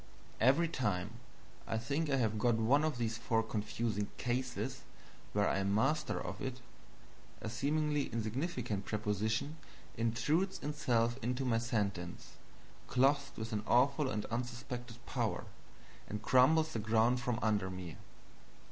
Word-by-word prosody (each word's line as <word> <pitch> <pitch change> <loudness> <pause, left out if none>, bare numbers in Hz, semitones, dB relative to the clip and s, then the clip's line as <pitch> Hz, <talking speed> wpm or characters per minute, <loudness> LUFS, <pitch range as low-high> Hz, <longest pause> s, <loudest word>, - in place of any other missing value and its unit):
Every 140 +8 +5
time 105 - -1 0.6
I 110 - 0
think 140 +7 -1
I 140 - +3
have 110 -4 +1
got 120 +1 +3
one 120 +7 +3
of 155 -5 0
these 115 -1 -1
four 115 -1 +1
confusing 105 -1 -2
"cases" 125 0 -2 0.5
where 105 0 +2
I - - +1
am 100 +1 +1
master 145 +8 +1
of - - -5
it, 130 -1 -3 0.8
a 110 - -4
seemingly 150 +3 +1
insignificant 115 - -2
preposition 110 +7 -1 0.4
intrudes 145 - +1
itself 125 -5 +1
into 125 +3 -1
my 115 -2 +2
sentence, 100 -7 -2 0.6
clothed 140 +2 +2
with 110 +1 -4
an 105 - 0
awful 135 +3 +4
and 105 -4 -2
unsuspected 120 0 -4
power, - - -1 0.6
and 105 0 -5
crumbles 155 +5 +5
the 115 - -1
ground 110 +3 +3
from 120 -1 -1
under 105 -3 +2
me. 90 -3 -6
120 Hz, 135 wpm, -35 LUFS, 110-135 Hz, 0.8 s, Every